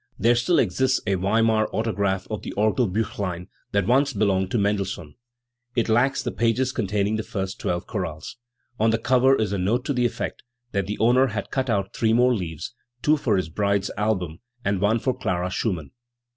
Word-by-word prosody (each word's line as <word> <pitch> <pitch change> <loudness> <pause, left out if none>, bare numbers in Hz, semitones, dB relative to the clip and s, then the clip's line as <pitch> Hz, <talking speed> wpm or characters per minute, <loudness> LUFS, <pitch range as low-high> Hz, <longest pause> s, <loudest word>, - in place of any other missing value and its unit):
There 115 +4 +4
still 120 +9 +2
exists 130 +6 +2
a 100 - +1
Weimar 110 +3 +2
autograph 100 -4 -1
of 105 - -3
the - - -7
Orgelbttchlein, 105 -4 0 0.2
that 100 -2 +1
once 135 +5 +3
belonged 95 -3 +1
to 120 - 0
Mendelssohn. 100 -6 -1 0.6
It 115 - +1
lacks 120 +5 +2
the - - -2
pages 120 +3 +1
containing 105 -2 0
the - - -1
first 95 -1 -4
twelve 85 0 -2
chorales. 80 -2 -5 0.4
On 110 +1 +4
the 115 - +2
cover 130 +3 +4
is 110 -5 -1
a 100 - -1
no'te 115 +8 0
to 145 - 0
the 125 -1 +2
effect - - -5 0.3
that 100 -1 -1
the 105 - -3
owner 125 +4 +4
had 105 -4 -4
cut 130 -1 -1
out 100 -3 0
three 110 -1 +2
more 125 +2 +4
leaves 85 0 -4 0.3
two 150 - +5
for 115 -9 +1
his 90 -3 -2
bride's 100 +2 0
album, 95 -6 -1 0.3
and 100 -2 0
one 105 +3 +3
for 130 +3 0
Clara 90 0 -2
Schumann*. 90 - -2
105 Hz, 185 wpm, -24 LUFS, 95-120 Hz, 0.6 s, two